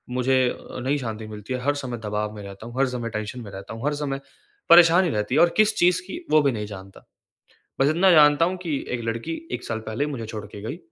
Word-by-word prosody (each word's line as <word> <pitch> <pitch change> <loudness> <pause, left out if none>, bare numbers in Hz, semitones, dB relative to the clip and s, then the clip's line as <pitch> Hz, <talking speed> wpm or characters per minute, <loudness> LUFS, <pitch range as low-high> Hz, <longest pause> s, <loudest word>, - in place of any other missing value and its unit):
मुझे 130 0 +2 0.3
नहीं 140 +3 +1
शांति 110 -4 -5
मिलती 105 +4 -7
है, 125 - -2
हर 145 +1 +1
समय 130 -4 -4
दबाव 105 +1 -2
में 105 - -8
रहता 100 +3 -9
हूँ, 120 - -10
हर 135 - +4
समय 120 -2 -4
टेंशन 110 +3 -5
में 100 -3 -9
रहता 95 +3 -8
हूँ, 115 +5 -7
हर 150 - +1
समय 140 -2 -3 0.5
परेशानी 175 +1 +7
रहती 105 +2 -1
है 160 - +5
और 170 - +6
किस 215 0 +4
चीज़ 180 +1 +3
की 340 - -7
वो 155 - +6
भी 140 -2 +2
नहीं 105 -2 -4
जानता। 95 -1 -11 0.7
बस 135 - +4
इतना 175 +5 +4
जानता 150 0 +6
हूँ 185 +1 -2
कि 160 -4 -1 0.2
एक 120 -1 -2
लड़की 115 +8 -3 0.2
1 125 - -4
साल 110 -1 -3
पहले 115 +7 -1
मुझे 130 -6 -5
छोड़ 110 -2 -6
के 100 0 -10
गई 115 +10 -5
125 Hz, 240 wpm, -24 LUFS, 110-150 Hz, 0.7 s, परेशानी